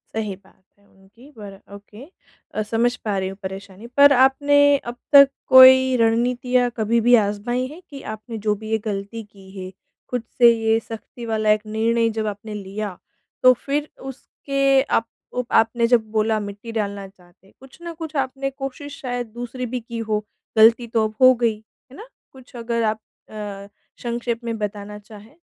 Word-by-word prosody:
सही 215 -3 -3
बात 190 0 -26 0.2
है 200 - -29
उनकी, 195 +8 -20
पर 205 -6 -11 0.2
ओके 210 +3 -13 0.5
अ, 215 - -2
समझ 230 +3 0
पा 210 -3 -3
रही 190 0 -2
हूँ 195 - -10
परेशानी। 195 +3 -8
पर 285 0 +8
आपने 285 +2 +4
अब 240 -3 -8 0.2
तक 280 -1 +9 0.2
कोई 260 0 +8
रणनीतियाँ 245 +2 +1
कभी 230 +1 +1
भी 245 - +8
आज़माई 235 +5 -2
हैं 310 +6 -12
कि 275 -2 -10
आपने 220 +2 -8
जो 210 - +3
भी 215 - -7
ये 220 - +2
गलती 205 +2 -5
की 195 -2 -18
है, 185 0 -7 0.4
खुद 250 -2 -3
से 240 -1 +7
ये 225 0 +1
सख़्ती 230 +1 -10
वाला 220 -1 -1
एक 215 0 0
निर्णय 230 +2 0
जब 215 - -2
आपने 210 +1 -6
लिया, 200 -1 -6 0.5
तो 255 0 +8
फिर 285 +4 -3
उसके 275 +1 -1
आपको 250 0 -3
आपने 230 +1 +1
जब 230 -3 +2
बोला, 220 0 +1
मिट्टी 205 +2 -8
डालना 200 -1 -4
चाहते 180 -1 -24
हैं, - - -24
कुछ 265 0 -16
न 340 0 -7
कुछ 320 -1 -8
आपने 270 0 -2
कोशिश 275 +1 -8
शायद 245 -2 -4
दूसरी 245 +1 -6
भी 250 +1 -4
की 235 0 -8
हो? 210 -1 -1 0.3
गलती 230 +2 +5
तो 225 -1 +1
अब 215 - -13
हो 255 0 +8
गई, 230 -2 +2 0.4
है - - -13
ना? 440 +5 -11 0.2
कुछ 260 -1 -17
अगर 235 0 -2
आप 215 0 0 0.3
अ, 205 -2 -7 0.3
संक्षेप 235 0 -4
में 230 -1 -4
बताना 210 0 -5
चाहें। 210 +1 -15
230 Hz, 180 wpm, -21 LUFS, 210-255 Hz, 0.5 s, तक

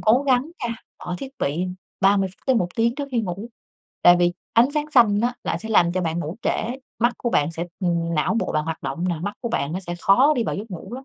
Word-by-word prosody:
cố 240 +5 +4
gắng 260 +3 +2
nha, 230 -1 -2 0.2
bỏ 180 - -5
thiết 270 - -6
bị 160 +6 -1 0.3
30 195 -1 +4
phút 185 - -20
tới 260 -3 +4
1 180 -5 +1
tiếng 230 +1 +2
trước 280 0 -4
khi 240 -3 +1
ngủ, 200 +2 -5 0.5
tại 175 0 +8
vì 175 0 +3 0.2
ánh 235 +4 +5
sáng 300 0 -1
xanh 225 -7 +5
á 240 +1 +1
lại - - -1
sẽ 220 - -8
làm 175 -6 +4
cho 185 - 0
bạn 165 -1 -1
ngủ 165 +3 -5
trễ, - - +2 0.5
mắt 240 +2 +3
của 240 - -1
bạn 150 -3 +2
sẽ 165 +1 -4
ừm, 170 -2 0
não 155 +7 +1
bộ - - -2
bạn 155 0 0
hoạt 160 0 -4
động 170 - -3
nà, 170 -3 -2
mắt 205 +2 -3
của 235 - -3
bạn 160 -11 -1
nó 185 - -2
sẽ 175 -2 -5
khó 255 - +5
đi 235 - +1
vào - - -2
giấc 210 +3 -6
ngủ 180 +6 -7
lắm. 265 +1 -8
200 Hz, 265 wpm, -23 LUFS, 175-240 Hz, 0.5 s, tại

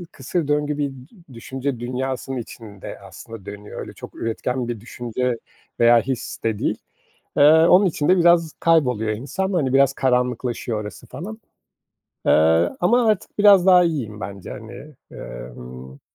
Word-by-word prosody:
ı 175 - -7
kısır 150 +3 -3
döngü 150 0 0
bir 145 -1 -1
dü 135 - -16
düşünce 130 +2 -4
dünyasının 130 +1 -3
içinde 110 -4 -9
aslında 115 -4 -11
dönüyor. 105 0 -8
Öyle - - -8
çok - - -11
üretken 120 +2 -3
bir 115 -3 -4
düşünce 120 +1 -3 0.4
veya 120 0 +6
his 125 +1 -5
de 110 -2 0
değil. - - -1 0.6
Eee, - - +4
onun 165 +6 +6
için 150 -4 -1
de 185 - +6
biraz 170 -2 +4
kayboluyor 125 -10 +2
insan, 145 - -3
hani, 145 -8 0
biraz 135 0 +5
karanlıklaşıyor 125 -3 -1
orası 105 -3 -9
falan. 215 +5 -8 0.9
Eee, - - +4 0.5
ama 235 +7 +3
artık 215 -1 -1
biraz 200 -3 +7
daha 180 -2 +7
iyiyim 130 -11 -2
bence, 100 -3 -7
hani. 110 +6 -9 0.3
Emm, 60 +2 -10
130 Hz, 150 wpm, -22 LUFS, 115-160 Hz, 0.9 s, biraz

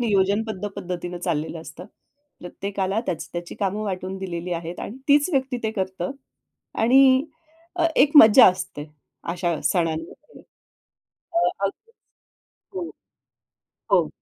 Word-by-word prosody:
नियोजनबद्ध 205 -1 0
पद्धतीनं 180 -2 -5
चाललेलं 165 -2 -3
असतं. 165 +2 -10 0.6
प्रत्येकाला 195 +3 -3
त्याची-त्याची 175 0 -5
कामं 200 +1 -1
वाटून 190 -1 -4
दिलेली 180 -2 -5
आहेत 170 +1 -5
आणि 225 - -6
तीच 290 +2 +5
व्यक्ती 265 -2 0
ते 220 - -1
करतं. 190 0 -3 0.7
आणि 260 +3 +5 0.5
अ, 340 - +2
एक 280 +2 +5
मज्जा 225 -2 +9
असते 150 -5 -6 0.5
अशा 175 -2 -2
सणांमध्ये. 165 - -2 0.9
अ, 340 - +1 0.3
अग 195 - -1 1.0
हो. 360 -2 -3 1.1
हो. - - +4
190 Hz, 110 wpm, -23 LUFS, 175-225 Hz, 1.1 s, मज्जा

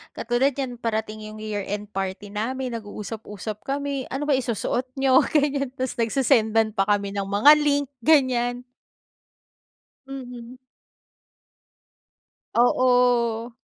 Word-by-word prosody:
katulad 250 +4 0
niyan 250 -4 -4
parating 215 -1 -3
'yong 215 0 -9
year-end 205 0 -4
party 195 +1 -4
namin, 250 +4 -3
nag-uusap-usap 210 -1 -7
kami, 280 -1 -2
ano 270 +3 -4
bang 280 -3 +2
isusuot 245 +1 -2
niyo? 265 -1 +4
Ganyan. 285 -2 +1
Ta's 260 -1 -2
nagse-sendan 225 -3 +2
pa 195 -1 0
kami 200 -1 +1
ng 200 -1 -3
mga 205 +9 +6
link 285 -2 +1
ganyan. 245 -3 +2 1.4
Mhm. 250 -2 -9 2.0
Oo. 245 -1 +3
240 Hz, 105 wpm, -24 LUFS, 215-265 Hz, 2.0 s, mga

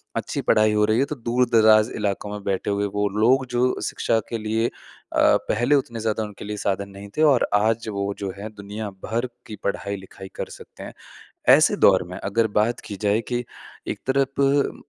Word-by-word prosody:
अच्छी - - -2
पढ़ाई 110 0 +3
हो 105 0 +3
रही 110 +2 +2
है, 135 - +3
तो 150 - -5
दूर-दराज़ 115 -3 +3
इलाकों 105 -1 -2
में 105 -1 -6
बैठे 100 0 -2
हुए 100 0 0
वो 105 0 +1
लोग 130 +4 +4
जो 125 +1 +1
शिक्षा 115 - 0
के 115 - -2
लिए 110 +1 0
अ, - - -7 0.8
पहले 120 +7 +2
उतने 120 -4 -1
ज़्यादा 110 0 -1
उनके 105 -1 -8
लिए 105 0 -4
साधन 100 0 -2
नहीं 100 +1 -11
थे - - +2
और 140 -5 +4
आज 110 +2 +1
वो 100 -1 -2
जो 100 -1 -3
है, 105 +2 -6
दुनिया 105 +1 -6 0.2
भर 120 +3 -1 0.2
की 105 - -7
पढ़ाई-लिखाई 100 -1 -4
कर - - -5
सकते - - -12
हैं। - - -8 0.6
ऐसे 155 +7 +3
दौर 95 - +5
में, 90 - -6
अगर 110 +4 0
बात 115 +3 0
की 100 - -6
जाए 105 +2 +3
कि 120 0 -1 0.4
एक - - -4
तरफ 140 +1 +1
110 Hz, 195 wpm, -23 LUFS, 100-120 Hz, 0.8 s, दौर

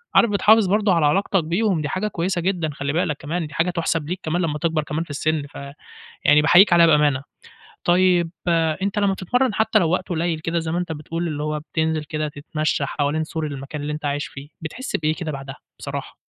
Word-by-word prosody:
عارف 235 - +6
بتحافظ 210 +1 +4
برضه 205 0 +2
على 165 -3 +3
علاقتك 195 +3 +2
بيهم، 175 +2 0
دي 150 - -3
حاجة 190 +6 -1
كويسة 180 -2 -2
جدًا، 175 -3 -1
خلّي 140 0 -3
بالك 155 -3 0
كمان 165 +3 -3
دي 150 - -13
حاجة 165 +3 +1
تُحسَب 165 -3 -1
ليك، 180 +1 -3
كمان 165 +3 -1
لمّا 155 -4 -1
تكبر 160 -1 0
كمان 150 +2 -3
في 170 - -17
السن، 155 +1 -1
فيعني 140 0 -12 0.5
باحييك 175 +5 +6
عليها 170 -1 +7
بأمانة، 150 -4 +3 0.6
طيب 175 -1 +3 0.5
أنتَ 200 +1 -1
لمّا 200 -1 +2
تتمرَّن، 245 +6 0
حتى 220 0 +3
لو 170 -6 +1
وقت 185 +1 -1
قليل 170 -2 -1
كده 165 +2 -1
زي 160 -1 -3
ما 170 - 0
أنتَ 180 -2 -3
بتقول، 165 +3 -4
اللي 150 -2 -3
هو 150 0 -2
بتنزل 160 -1 0
كده 155 0 -3
تتمشى 150 0 -2
حوالين 150 +2 -1
سور 160 0 -4
المكان 140 +1 -6
اللي 145 +1 -3
أنتَ 150 0 -6
عايش 145 0 -1
فيه، 135 +2 -10
بتحس 225 - -4
بإيه 155 0 0
كده 160 -2 -4
بعدها، 135 -1 -7 0.2
بصراحة؟ - - -6
160 Hz, 210 wpm, -22 LUFS, 150-180 Hz, 0.6 s, عليها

